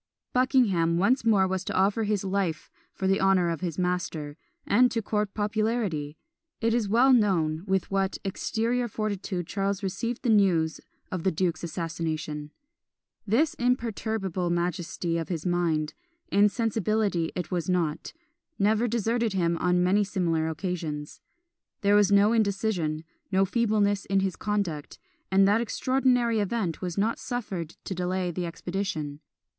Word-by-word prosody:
Buckingham 210 -11 +3
once 230 +9 +2
more 205 -4 +4
was 185 0 -2
to - - -3
offer 200 +4 +2
his 205 -2 0
life 190 -4 -2 0.2
for 190 - -5
the 195 +1 +2
honour 190 -2 +3
of 165 - -4
his 170 -4 -3
master 175 -5 -2 0.3
and 250 +4 +4
to 230 - -1
court 210 -2 -2
popularity! 210 -8 -1 0.4
It 225 0 +1
is 230 -4 0
well 250 +5 +5
known 170 -8 +2
with 190 0 0
what 195 0 0
exterior 230 +5 -1
fortitude 200 -4 -3
Charles 195 +2 -2
received 230 +6 -3
the 245 - +1
news 180 -7 +3 0.3
of 185 - -2
the 190 - +2
duke's 175 0 -1
assassination; 160 -3 -4 0.8
this 275 +10 +2
imperturbable 220 -7 -1
majesty 170 -1 -1
of 165 - -5
his 165 -3 -3
mind 165 -4 0 0.4
insensibility 210 -3 +1
it 180 -3 -4
was 175 -1 -1
not 170 -4 -1 0.5
never 215 +4 +2
deserted 230 -1 0
him 170 -3 +1
on 180 0 +2
many 195 +3 +3
similar 170 -5 0
occasions. 160 -3 -4 0.6
There 200 0 +3
was 205 -1 +5
no 200 +2 +5
indecision 195 -7 0 0.3
no 190 0 +3
feebleness 205 -2 +1
in 195 0 +1
his 190 -1 -1
conduct; 200 -8 -3 0.3
and 195 0 +5
that 210 +3 +3
extraordinary 245 -1 +1
event 205 -5 -1
was 180 -1 -4
not 215 +3 +1
suffered 195 -10 -4
to - - -4
delay 180 0 -1
the 175 +1 -3
expedition. 165 -4 -4
195 Hz, 145 wpm, -27 LUFS, 170-215 Hz, 0.8 s, well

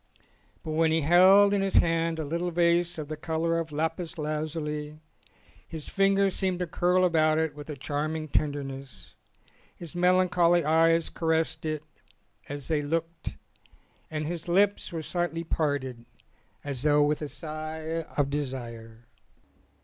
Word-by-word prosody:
But 160 - -5
when 160 +1 +2
he 160 0 +2
held 190 +6 +6
in 200 - +2
his 195 -1 -1
hand 165 0 +2
a 160 - -3
little 170 +4 -2
vase 175 0 +2
of 155 -2 -5
the 155 - -4
colour 165 +2 -1
of 160 -2 -5
lapis 160 +3 -2
lazuli 150 0 -3 0.7
his 160 -2 -6
fingers 195 0 +2
seemed 185 -2 0
to 180 - -2
curl 180 +2 +2
about 155 -3 +3
it 160 -1 0
with 145 +1 -10
a 150 - -4
charming 155 +3 -3
tenderness, 135 - -3 0.6
his 170 -1 -9
melancholy 175 -2 +3
eyes 165 +1 +3
caressed 160 -1 0
it 155 -1 -3 0.7
as 145 -1 -6
they 155 -2 +1
looked, 165 +2 -3 0.7
and 155 -1 -3
his 170 +1 -5
lips 200 +4 +2
were 165 -2 -4
slightly 175 0 -2
parted 145 -7 -2 0.6
as 140 -4 -4
though 150 0 +4
with 150 +1 0
a 150 - -3
sigh 155 +1 -5
of 140 -1 +1
desire. 120 -5 -5
160 Hz, 145 wpm, -27 LUFS, 150-170 Hz, 0.7 s, held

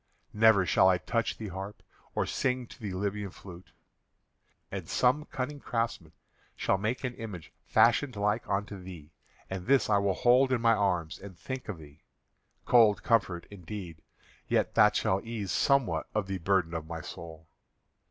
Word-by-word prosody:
Never 105 -3 +5
shall 95 +1 +5
I 90 - +4
touch 115 +5 -2
the 110 -2 -6
harp 95 +3 -7 0.3
or - - +1
sing 125 -1 -1
to - - -15
the 100 -4 -4
Libyan 100 +1 -2
flute. 90 -2 -13 1.0
And - - -6
some 135 +5 +2
cunning 145 +1 -4
craftsman 115 - -3 0.4
shall 95 - 0
make 110 +6 -2
an 125 -2 -2
image 105 -9 -8 0.2
fashioned 120 +2 +3
like 105 +2 -1
unto 100 0 -2
thee, 85 -5 -11 0.4
and 95 -2 -6
this 135 -4 +3
I 100 - +5
will 100 -2 +1
hold 130 +2 +4
in 130 - +2
my 115 0 +4
arms 90 -6 0
and 95 -3 -11
think 130 +4 -6
of 100 - -4
thee. 75 -1 -15 0.6
Cold 115 -4 +5
comfort 95 -7 +1
indeed, 90 -4 -8 0.5
yet - - +1
that - - +5
shall 95 +1 +1
ease 110 -4 -4
somewhat 140 -3 +2
of 105 -2 +1
the 95 -1 -4
burden 90 -1 +1
of 80 -2 -4
my 80 -1 -5
soul. 80 0 -9
100 Hz, 165 wpm, -29 LUFS, 90-115 Hz, 1.0 s, Never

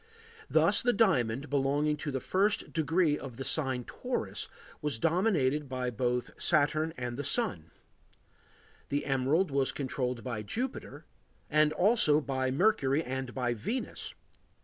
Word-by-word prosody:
Thus - - +4
the 245 0 +2
diamond, 140 - +1
belonging 145 +2 +1
to 150 0 -4
the 135 -2 -2
first 200 - 0
degree 160 -1 +1
of 130 -4 -9
the 135 - -5
sign 135 -2 0
Taurus, - - -4 0.3
was 150 -5 -1
dominated 155 - +1
by 130 -1 -2
both 125 +1 -1
Saturn 155 0 +2
and 125 -1 -4
the 145 - -3
Sun; 145 - +1 1.2
the 145 +1 -1
emerald 140 +6 +1
was 135 -1 +2
controlled 125 -3 -3
by 115 -4 -4
Jupiter, 240 - -5 0.5
and 155 0 +4
also 175 -3 +5
by 130 -3 -2
Mercury 145 -2 +2
and 130 -2 -5
by 125 -2 0
Venus. 220 - -5
140 Hz, 135 wpm, -30 LUFS, 130-160 Hz, 1.2 s, also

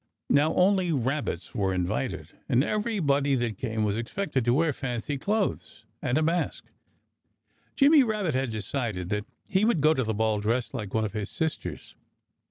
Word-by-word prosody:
Now, 145 +3 +3
only 185 -1 +3
rabbits 135 - -2
were 95 -2 0
invited. 90 -1 -2 0.2
And 125 +3 +4
everybody 155 -11 +1
that 120 -5 -2
came 110 -3 -1
was 105 +1 0
expected 135 +2 -2
to 120 - +3
wear 160 0 +2
fancy 130 +2 -3
clothes, 205 +5 -2 0.2
and 125 - 0
a 155 - +2
mask. 170 +3 -1 1.1
Jimmy 290 +1 +6
Rabbit 215 - 0
had 130 0 0
decided 110 -4 -3
that 105 0 -1 0.2
he 190 +1 +1
would 220 -6 +3
go 155 +2 +5
to 130 - 0
the 110 -1 -2
Ball 110 0 +1
dressed 115 +3 -1
like 105 -6 -5
one 110 0 +2
of 105 - -5
his 105 -2 -3
sisters. 160 -1 -4
135 Hz, 170 wpm, -27 LUFS, 110-165 Hz, 1.1 s, Jimmy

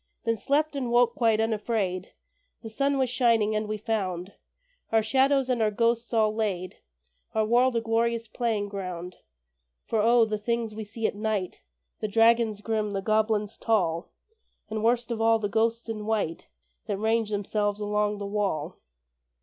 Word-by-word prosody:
Then 230 -1 +1
slept, 290 +7 0
and 260 -3 -2
woke 240 0 +4
quite 225 -3 +2
unafraid. 215 -4 -1 0.5
The 225 - -7
sun 275 +4 +1
was 260 -1 +2
shining, 230 -4 +2
and 215 0 -1
we 215 0 -2
found 195 -4 -3 0.6
Our 225 -1 +3
shadows 265 +4 +3
and 250 -3 0
our 215 - +3
ghosts 230 +2 0
all 220 -2 +2
laid, 195 -5 -2 0.6
Our 220 0 +2
world 240 +3 +3
a 230 - +2
glorious 230 0 0
playing 220 -3 -1
ground. 185 -3 -6 0.7
For 220 - 0
O! 230 +1 +5
the 215 -1 -3
things 230 0 -2
we 215 0 -6
see 220 +2 -5
at - - +1
night 205 -3 -3 0.4
The 215 - -2
dragons 225 0 +3
grim, 215 -1 -1
the 195 - -1
goblins 215 0 0
tall, 175 -7 0 0.6
And, 215 0 -2
worst 240 +1 +1
of 225 -1 -2
all, 225 0 +4
the 215 -2 -2
ghosts 225 +3 0
in 215 -2 -5
white 210 -7 -1 0.4
That 205 -3 -1
range 220 +1 +1
themselves 205 0 -1
along 210 0 0
the 205 - -5
wall! 195 -6 -2
220 Hz, 165 wpm, -27 LUFS, 205-230 Hz, 0.7 s, O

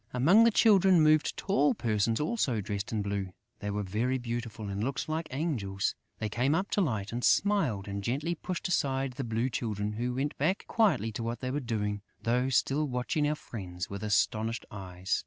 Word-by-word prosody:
Among 180 - +6
the - - +7
Children 195 -6 +5
moved 155 0 +3
tall 150 -7 +2
persons 115 0 0
also 150 - 0
dressed 100 0 -4
in 110 -2 -1
blue: 100 -2 -3 0.3
they 105 - -4
were 105 0 -2
very 115 +7 0
beautiful 115 -3 -5
and 100 +1 -3
looked 135 +3 -2
just - - -3
like 160 +1 -2
angels. 125 - -1 0.2
They 110 - -2
came 125 +8 +1
up 190 +4 -1
to 205 - +2
Light 110 - -1
and 120 +1 -3
smiled 120 - +2
and 100 0 -4
gently 145 +10 -1
pushed 175 +2 -4
aside 135 -6 0
the 135 - -4
Blue 115 +1 0
Children, 105 -3 -2
who 120 +3 -2
went 140 +3 -1
back 165 +8 +1
quietly 195 - +2
to 110 - -5
what 115 0 -3
they 130 -1 -2
were 145 - -1
doing, 105 -5 -2 0.2
though 125 +2 +1
still 140 +3 +2
watching 130 +4 0
our 150 - +1
friends 95 -9 -7
with 100 0 -5
astonished 110 +2 0
eyes. 95 -2 -3
120 Hz, 195 wpm, -30 LUFS, 105-150 Hz, 0.3 s, the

